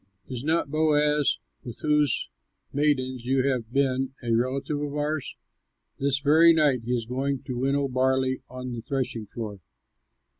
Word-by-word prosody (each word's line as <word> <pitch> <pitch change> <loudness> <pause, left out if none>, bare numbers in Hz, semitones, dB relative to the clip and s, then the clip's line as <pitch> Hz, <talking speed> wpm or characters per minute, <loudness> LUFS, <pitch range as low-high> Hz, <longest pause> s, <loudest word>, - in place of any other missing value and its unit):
Is 125 -1 -5
not 155 -2 0
Boaz, 150 -1 +3 0.3
with 120 - -8
whose 150 -3 +2 0.5
maidens 130 -4 0
you 135 0 +2
have 120 -4 -1
been, 135 0 0
a 115 -1 0
relative 135 +5 0
of 145 -1 -3
ours? 150 -1 -2 0.6
This 140 -1 +2
very 155 +4 +6
night 145 -6 +3
he 125 - -1
is 115 -2 -2
going 135 +3 -2
to 125 -2 -4
winnow 140 +2 +1
barley 130 0 +1
on 125 0 -6
the 120 -1 -5
threshing 120 -3 -3
floor. 105 -3 -6
135 Hz, 150 wpm, -26 LUFS, 125-145 Hz, 0.6 s, very